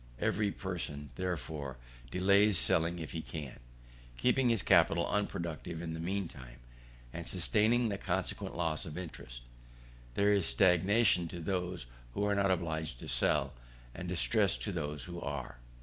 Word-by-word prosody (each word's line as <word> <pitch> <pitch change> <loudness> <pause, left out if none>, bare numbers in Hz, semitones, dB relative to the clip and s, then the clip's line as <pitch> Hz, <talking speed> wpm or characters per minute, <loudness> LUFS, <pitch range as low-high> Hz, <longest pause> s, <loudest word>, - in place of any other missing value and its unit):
Every 105 - +1
person, 80 -8 -5
therefore, 80 -7 -4 0.3
delays 100 - +4
selling 85 +1 +4
if 80 -3 -6
he 80 - -3
can, 75 -7 -7 0.6
keeping 125 - +3
his 115 -6 +1
capital 85 -2 +4
unproductive 85 -5 -3
in 80 -1 -4
the 80 - -5
mean 95 +2 -2
time, 65 -5 -12 0.6
and 85 -1 -6
sustaining 110 +6 +2
the 100 -1 -3
consequent 95 -2 -2
loss 80 -3 0
of 75 - -7
interest. - - -8 0.7
There 100 +1 +4
is 100 -5 +2
stagnation 95 0 +4
to 85 +1 -7
those 90 -2 -2 0.3
who 100 - 0
are 105 0 +2
not 100 -1 +2
obliged 80 -6 -1
to - - -7
sell, - - +2 0.4
and 90 +4 -6
distress 100 +2 +2
to 105 - -3
those 75 -4 -4
who 85 -2 -7
are. 70 -4 -5
85 Hz, 150 wpm, -33 LUFS, 80-100 Hz, 0.7 s, delays